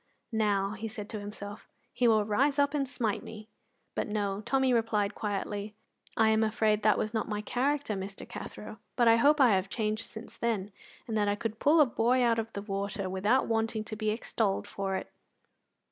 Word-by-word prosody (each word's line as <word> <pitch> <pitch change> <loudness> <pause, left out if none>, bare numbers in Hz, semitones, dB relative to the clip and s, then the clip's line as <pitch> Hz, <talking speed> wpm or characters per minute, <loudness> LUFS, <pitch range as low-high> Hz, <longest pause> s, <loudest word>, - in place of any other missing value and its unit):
"Now," 205 -3 +1
he 215 +2 -5
said 210 -2 -7
to 215 - -4
himself, 205 0 -8 0.3
"he 245 - +2
will 215 -2 +4
rise 275 +7 +2
up 285 0 +3
and 275 -3 0
smite 235 -6 -1
me." 215 0 -10 0.4
But - - -2
no; 205 -1 -1
Tommy 265 -1 +3
replied 220 -3 +1
quietly; 205 0 -3 0.4
"I 220 -1 +5
am 220 0 +3
afraid 215 -1 +2
that 215 -1 +4
was 215 - -2
not 220 -1 -1
my 210 -1 -2
character, 275 +2 0
Mr. 195 0 -6
Cathro; - - -8 0.2
but 240 -2 +3
I 230 0 +7
hope 295 +5 +4
I 255 -4 +6
have 190 -1 +1
changed 215 0 -1
since 225 0 -8
then, 210 -4 -1 0.4
and 225 - -3
that 205 -1 +2
I 205 - +2
could 220 +1 -4
pull 310 +3 +5
a 300 - +8
boy 245 +1 +2
out 230 -1 +3
of 225 0 -4
the 200 - -5
water 200 -1 -3
without 205 +7 +2
wanting 225 -1 0
to 215 - -6
be 215 0 -1
extolled 215 -2 -1
for 195 -1 -3
it." - - -5
215 Hz, 200 wpm, -30 LUFS, 205-235 Hz, 0.4 s, a